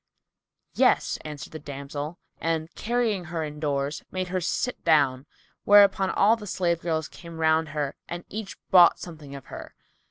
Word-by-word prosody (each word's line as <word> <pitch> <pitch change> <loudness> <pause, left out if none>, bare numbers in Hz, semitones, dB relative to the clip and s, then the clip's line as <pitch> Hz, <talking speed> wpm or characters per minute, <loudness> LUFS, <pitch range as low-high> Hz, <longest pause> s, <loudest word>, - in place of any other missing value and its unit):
"Yes," - - +2
answered 150 -1 -8
the 155 - -6
damsel 145 +2 -6 0.2
and, 165 0 -2
carrying 225 -5 -1
her 165 -1 -3
indoors, 150 -1 -3
made 185 -1 -3
her 185 0 -1
sit 250 +8 -2
down; 140 -4 +3 0.4
whereupon 200 -2 +6
all 215 +3 +4
the 210 -3 -10
slave 170 -3 0
girls 160 -3 -1
came 170 -2 -11
round 160 0 +2
her 145 -2 -3
and 175 0 -6
each 215 -1 -7
bought 175 -2 +7
something 155 -5 -10
of 135 - -10
her. - - -9
160 Hz, 155 wpm, -26 LUFS, 150-185 Hz, 0.4 s, bought